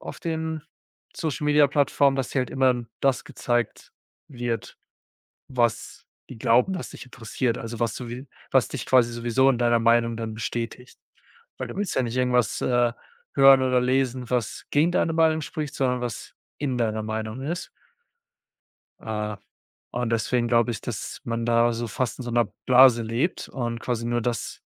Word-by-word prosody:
auf -, -, -8 dB
den 160 Hz, -2 st, -3 dB, 0.5 s
Social-Media-Plattformen, 145 Hz, -2 st, +2 dB
dass 130 Hz, -2 st, -2 dB
dir 135 Hz, -, +1 dB
halt 125 Hz, -, -3 dB
immer 130 Hz, -1 st, +3 dB
n 120 Hz, -2 st, -3 dB
das 135 Hz, -2 st, +2 dB
gezeigt 120 Hz, -1 st, -2 dB, 0.4 s
wird, 120 Hz, -4 st, -4 dB, 0.7 s
was 120 Hz, -4 st, -1 dB, 0.2 s
die -, -, -9 dB
glauben, 125 Hz, +12 st, +3 dB
was 180 Hz, -, -5 dB
dich -, -, -10 dB
interessiert. 120 Hz, -1 st, -3 dB
Also, 115 Hz, 0 st, -6 dB
was 115 Hz, -1 st, 0 dB
du 125 Hz, -, -6 dB
wie 125 Hz, +4 st, -7 dB, 0.2 s
was -, -, +4 dB
dich -, -, -5 dB
quasi 120 Hz, -2 st, +4 dB
sowieso 120 Hz, +3 st, +2 dB
in 130 Hz, -, +2 dB
deiner 120 Hz, -1 st, +3 dB
Meinung 115 Hz, 0 st, +3 dB
dann 115 Hz, -1 st, -4 dB
bestätigt. 115 Hz, +2 st, -5 dB, 0.6 s
Weil -, -, -4 dB
du -, -, -8 dB
willst 205 Hz, -1 st, -2 dB
ja -, -, +2 dB
nicht 120 Hz, 0 st, -3 dB
irgendwas, 125 Hz, -4 st, +1 dB
äh, 120 Hz, -1 st, +2 dB, 0.4 s
hören 135 Hz, -1 st, +7 dB
oder 125 Hz, -1 st, +3 dB
lesen, 130 Hz, -1 st, 0 dB
was 120 Hz, -4 st, -2 dB
gegen 155 Hz, +4 st, +3 dB
deine 165 Hz, -, +1 dB
Meinung 160 Hz, -1 st, +3 dB
spricht, 150 Hz, -2 st, -5 dB
sondern 125 Hz, -2 st, 0 dB
was 120 Hz, -3 st, -6 dB, 0.2 s
in 135 Hz, -4 st, -2 dB
deiner 110 Hz, -2 st, 0 dB
Meinung 110 Hz, +3 st, -4 dB
ist. 170 Hz, +5 st, -4 dB, 1.3 s
Äh, 105 Hz, -1 st, -3 dB, 0.5 s
und 120 Hz, -1 st, -2 dB
deswegen 120 Hz, +1 st, +1 dB
glaube 120 Hz, 0 st, +3 dB
ich, 115 Hz, -, -4 dB
dass 115 Hz, -4 st, -6 dB
man 115 Hz, 0 st, -2 dB
da 120 Hz, 0 st, +3 dB
so 115 Hz, +1 st, -3 dB
fast 115 Hz, +3 st, -2 dB
in 130 Hz, -, -6 dB
so 120 Hz, -, -4 dB
'ner 120 Hz, -2 st, +1 dB
Blase 125 Hz, -2 st, +7 dB
lebt 115 Hz, +10 st, -2 dB
und 120 Hz, -3 st, -4 dB
quasi 120 Hz, -2 st, -2 dB
nur 120 Hz, 0 st, 0 dB
das 120 Hz, -1 st, -3 dB
120 Hz, 170 wpm, -25 LUFS, 115-135 Hz, 1.3 s, hören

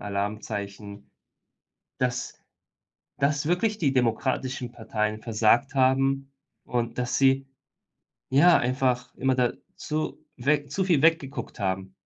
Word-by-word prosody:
Alarmzeichen 100 Hz, 0 st, -5 dB, 0.9 s
dass 125 Hz, -1 st, -2 dB, 0.8 s
dass 145 Hz, +1 st, +1 dB
wirklich 205 Hz, +5 st, +1 dB
die 140 Hz, -5 st, +1 dB
demokratischen 125 Hz, +1 st, -1 dB
Parteien 110 Hz, -2 st, -3 dB
versagt 115 Hz, +5 st, +2 dB
haben 135 Hz, +1 st, +2 dB, 0.3 s
und 120 Hz, -1 st, -2 dB
dass 125 Hz, 0 st, -1 dB
sie, 135 Hz, 0 st, +3 dB, 0.8 s
ja, 165 Hz, +6 st, +6 dB
einfach 125 Hz, 0 st, 0 dB
immer 130 Hz, 0 st, +1 dB
dazu 150 Hz, +5 st, -3 dB
weg 145 Hz, +2 st, 0 dB
zu 190 Hz, +3 st, 0 dB
viel 165 Hz, -7 st, +3 dB
weggeguckt 160 Hz, -4 st, +1 dB
haben. 95 Hz, -1 st, -2 dB
130 Hz, 105 wpm, -26 LUFS, 110-140 Hz, 0.9 s, ja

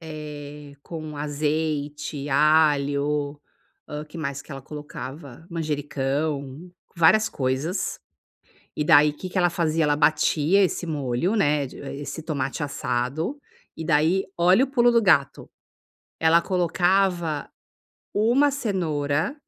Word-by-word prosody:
eh, 150 Hz, -2 st, -9 dB
com 155 Hz, -3 st, -7 dB
azeite, 150 Hz, -1 st, -2 dB
alho, 145 Hz, -1 st, +2 dB, 0.5 s
hã, 150 Hz, 0 st, -5 dB
que 150 Hz, +2 st, -11 dB
mais 140 Hz, -2 st, -4 dB
que -, -, -11 dB
ela 135 Hz, -, -7 dB
colocava, 145 Hz, +1 st, -9 dB
manjericão, 145 Hz, 0 st, -3 dB, 0.2 s
várias 195 Hz, +6 st, +4 dB
coisas. 135 Hz, +7 st, -2 dB, 0.8 s
E, 150 Hz, -, +1 dB
daí, 150 Hz, 0 st, +6 dB
que 185 Hz, -, -7 dB
que 185 Hz, -, -4 dB
ela 175 Hz, -1 st, +4 dB
fazia, 165 Hz, -2 st, 0 dB
ela 150 Hz, -1 st, +2 dB
batia 155 Hz, +4 st, +3 dB
esse 180 Hz, -1 st, -1 dB
molho, 145 Hz, -, -1 dB
né, 145 Hz, -8 st, +2 dB
de -, -, -12 dB
eh, 140 Hz, -, -6 dB
esse 145 Hz, +2 st, -6 dB
tomate 145 Hz, -2 st, -3 dB
assado, 140 Hz, -, -2 dB, 0.4 s
e, 160 Hz, -, -5 dB
daí, 165 Hz, +4 st, +3 dB
olha 180 Hz, +7 st, +5 dB
o 270 Hz, -, -3 dB
pulo 240 Hz, -3 st, +4 dB
do 235 Hz, -1 st, +4 dB
gato, 160 Hz, -9 st, +2 dB, 0.7 s
ela 165 Hz, +1 st, +5 dB
colocava 175 Hz, -3 st, +1 dB, 0.7 s
uma 245 Hz, +7 st, +3 dB
cenoura 160 Hz, -, -1 dB
150 Hz, 125 wpm, -24 LUFS, 145-175 Hz, 0.8 s, daí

